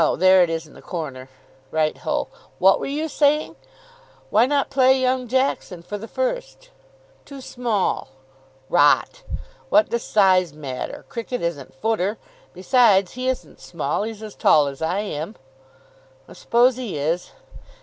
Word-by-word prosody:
There 185 +1 +6
it 175 - +3
is 165 0 -3
in 155 - -17
the - - -14
corner." 135 -7 -6 0.4
"Right 155 -1 0
ho!... - - -2 0.3
What 190 +1 +5
were - - -4
you 300 +3 -2
saying?" 300 0 +1 0.8
"Why 225 +4 +4
not 280 0 0
play 265 -1 +4
young 255 -1 0
Jackson 250 -8 -1
for 205 +3 -6
the 225 - -8
first?" - - -4 0.5
"Too 280 -1 -11
small." 240 - -1 0.6
"Rot. 145 - +3 0.5
What 315 - +4
does 235 - -1
size 185 -7 +3
matter? 140 -4 -6
Cricket 240 0 -5
isn't 145 -7 -4
footer. 215 +5 -1 0.3
Besides, 200 -2 +3
he 255 +1 -4
isn't 260 - -5
small. 150 -2 -3
He's 220 0 -5
as 215 -2 -8
tall 150 -2 +4
as 140 0 -6
I 180 +5 0
am." 200 0 -5 0.9
"I - - -13
suppose 245 +1 +2
he 235 -11 -4
is. 160 +5 -2
210 Hz, 150 wpm, -22 LUFS, 170-255 Hz, 0.9 s, There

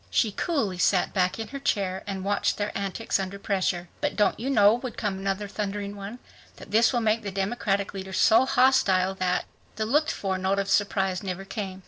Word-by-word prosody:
She 220 - +2
coolly 215 - -1
sat 180 0 +2
back 185 -2 +1
in 225 - -5
her 275 - -6
chair 195 -7 -1
and 195 -1 -4
watched 205 0 +1
their 205 0 -3
antics 200 +2 -1
under 195 +1 -4
pressure. 185 -3 -1
"But 295 -1 -1
don't 210 - +2
you 250 +4 -3
know," 210 -5 +6
would 245 +1 -5
come 200 -3 -2
another 195 +1 -2
thundering 205 0 -4
one, 200 +4 -7 0.4
"that - - -13
this 225 +2 +4
will 240 -3 0
make 220 0 +1
the 205 - -4
Democratic 195 0 -1
leaders 190 -1 -5
so 240 +4 +5
hostile 250 -8 +3
that.. 185 -1 -1 0.2
." - - -33
The 215 - -1
looked 300 +7 +2
for 190 -2 -2
note 190 +1 0
of 200 0 -1
surprise 195 -2 +1
never 190 -1 -5
came. 195 -2 -5
200 Hz, 205 wpm, -26 LUFS, 190-225 Hz, 0.4 s, know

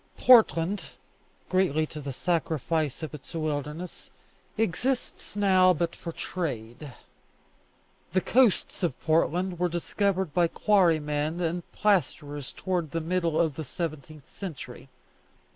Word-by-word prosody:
Portland, 205 -6 +5 0.6
greatly 180 -5 +2
to 150 0 -8
the 140 -1 -5
sacrifice 160 -1 -1
of 155 - -5
its 150 +3 -10
wildness, 155 +2 -4 0.5
exists 225 +4 -2
now 185 -2 +5
but 170 +1 -2
for 170 - -6
trade. 140 -6 -5 1.2
The 185 - +3
coasts 245 -2 +2
of 175 - -1
Portland 170 +3 +1
were 180 0 +2
discovered 190 0 -1
by 175 +1 +3
quarrymen 160 -5 +2
and 175 0 -2
plasterers 145 -8 0
towards 180 -4 -2
the 165 - 0
middle 165 -1 0
of 160 -3 +2
the 160 - -3
seventeenth 155 -1 -6
century. 135 -8 -8
165 Hz, 115 wpm, -27 LUFS, 150-185 Hz, 1.2 s, Portland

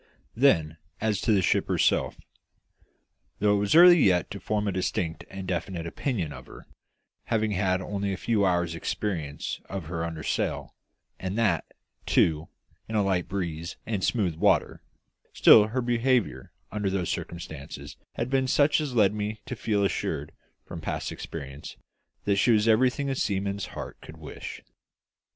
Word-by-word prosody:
Then, 85 - +3 0.2
as 105 -3 0
to 115 - +1
the 100 -3 +3
ship - - +2
herself. - - +1 1.2
Though 105 0 +3
it - - +1
was 100 +5 +1
early 175 0 +9
yet 90 - +3
to 100 - -5
form 105 0 -1
a - - +1
distinct 90 -2 -2
and 95 -1 -7
definite 85 -1 -3
opinion 85 - -3
of - - -11
her, - - -13 0.6
having 110 -1 0
had 95 -1 +1
only 100 0 -2
a 95 - -3
few 110 0 +1
hours' 90 -3 +1
experience 85 -3 -3
of 95 -4 -5
her 85 +1 -3
under 80 -2 -5
sail, - - -2 0.5
and 95 +3 -4
that, 105 -8 +1 0.4
too, 80 0 +2 0.4
in 110 - -3
a 105 - +3
light 95 -3 0
breeze 85 -3 -4
and 105 -4 -2
smooth 100 -7 +1
water, - - +2 0.5
still 105 -1 +7
her 125 +4 -1
behaviour 120 - 0 0.2
under 105 -1 -1
those 95 -3 -1
circumstances 75 -4 -7 0.2
had 115 - -2
been 135 -1 +2
such 145 +3 +3
as 140 -5 -4
led 105 -3 +4
me 105 +1 -3
to 130 - -5
feel 105 -3 0
assured, 75 -5 -2 0.3
from - - -8
past - - -3
experience, 70 -3 -8 0.5
that 100 -1 +2
she 100 - +3
was 110 -1 +4
everything 125 +5 +3
a 135 - 0
seaman's 100 -4 -1
heart - - -7
could - - -12
wish. - - -8
100 Hz, 160 wpm, -27 LUFS, 85-110 Hz, 1.2 s, early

